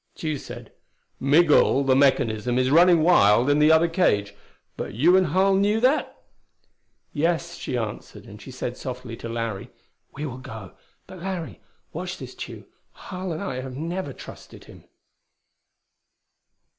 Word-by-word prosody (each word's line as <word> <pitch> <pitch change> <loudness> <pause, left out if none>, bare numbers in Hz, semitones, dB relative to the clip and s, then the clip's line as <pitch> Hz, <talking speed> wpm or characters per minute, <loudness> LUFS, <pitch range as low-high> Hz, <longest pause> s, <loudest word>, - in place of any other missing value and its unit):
Tugh 155 -3 -3
said, 120 -3 -10 0.5
"Migul, 145 -1 +4
the 135 -1 +3
mechanism, 125 -4 +2
is 130 +1 +1
running 170 +1 +5
wild 120 - +4
in 145 - +2
the 150 +1 +5
other 160 +1 +5
cage. 105 - +1 0.4
But - - -6
you 165 +10 +4
and 190 -1 +3
Harl 190 +5 +2
knew 205 +3 +2
that?" 260 +6 +1 0.9
"Yes," 170 +2 -1
she 125 - -4
answered, 110 -3 -6
and - - -12
said - - -6
softly - - -7
to 115 - -7
Larry, 115 -4 -4 0.4
"We 150 - -6
will 130 -3 -6
go. 110 -7 -10 0.3
But, 185 - -12
Larry, 175 -5 -5 0.3
watch - - -5
this - - -9
Tugh! - - -9 0.3
Harl 185 0 -7
and 160 +4 -4
I 130 -10 -4
never 150 +6 -5
trusted - - -12
him." - - -16
150 Hz, 145 wpm, -24 LUFS, 125-175 Hz, 0.9 s, running